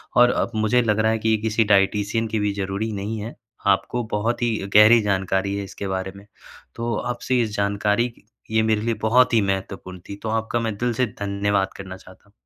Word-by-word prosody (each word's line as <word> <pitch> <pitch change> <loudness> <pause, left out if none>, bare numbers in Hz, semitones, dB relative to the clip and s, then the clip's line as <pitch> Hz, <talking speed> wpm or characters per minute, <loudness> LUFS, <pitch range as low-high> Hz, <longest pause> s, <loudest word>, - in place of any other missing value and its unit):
और 120 0 +6
अब - - -5
मुझे 110 +3 +2
लग 110 -2 +1
रहा 110 +1 +3
है 110 - 0
कि 110 - 0
ये 110 - +3
किसी 110 +1 +2
डायटीशियन 105 +3 +1
की 110 0 -2
भी 105 -1 0
ज़रूरी 100 +2 -3
नहीं 110 +2 -4
है। 110 +3 -7 0.3
आपको 100 +5 +1
बहुत 110 +4 -1
ही 120 -2 +1 0.2
गहरी 110 +2 +8
जानकारी 95 -1 0
है 100 - -3
इसके 100 0 -7
बारे 95 0 -3
में। 100 +1 -13 0.5
तो 115 -1 -2
आप 120 +2 -3
इस 115 -4 +1
जानकारी 105 +3 0 0.4
ये 110 0 +3
मेरे 110 -1 +1
लिए 115 +1 0
बहुत 125 +3 +4
ही 115 - +5
महत्वपूर्ण 95 -1 -4
थी 100 - -5
तो 110 - -2
आपका 110 +1 -1
मैं 115 -2 -2
दिल 120 +2 0
से 125 +3 +1
धन्यवाद 100 -1 0
करना 95 -1 -8
चाहता 95 0 -17
हूँ। 105 - -26
105 Hz, 210 wpm, -22 LUFS, 100-115 Hz, 0.5 s, गहरी